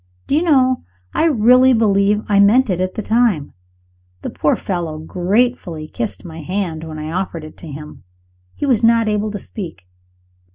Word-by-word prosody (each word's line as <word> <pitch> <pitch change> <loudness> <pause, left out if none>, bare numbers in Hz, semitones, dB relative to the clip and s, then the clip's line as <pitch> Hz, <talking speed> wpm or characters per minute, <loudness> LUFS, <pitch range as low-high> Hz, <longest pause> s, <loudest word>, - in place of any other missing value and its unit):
Do 280 - 0
you 310 - +3
know, 260 -7 +3 0.3
I - - +2
really 255 -2 +5
believe 210 -2 +2
I 205 -3 +3
meant 220 +4 +5
it 180 0 -1
at 185 0 -2
the 215 - -3
time! 220 -11 +1 0.7
The - - -4
poor 150 - +1
fellow 170 -5 -4
gratefully 180 0 -1
kissed 215 +2 -5
my 165 -1 -8
hand 175 -1 -3
when 160 -1 -7
I 155 +1 -5
offered 175 -2 -3
it 155 - -11
to 170 - -11
him 150 -5 -10 0.5
he - - -3
was 250 -6 +2
not 230 -1 +4
able 210 0 0
to 205 - -5
speak. 175 - -8
200 Hz, 175 wpm, -18 LUFS, 165-235 Hz, 0.7 s, really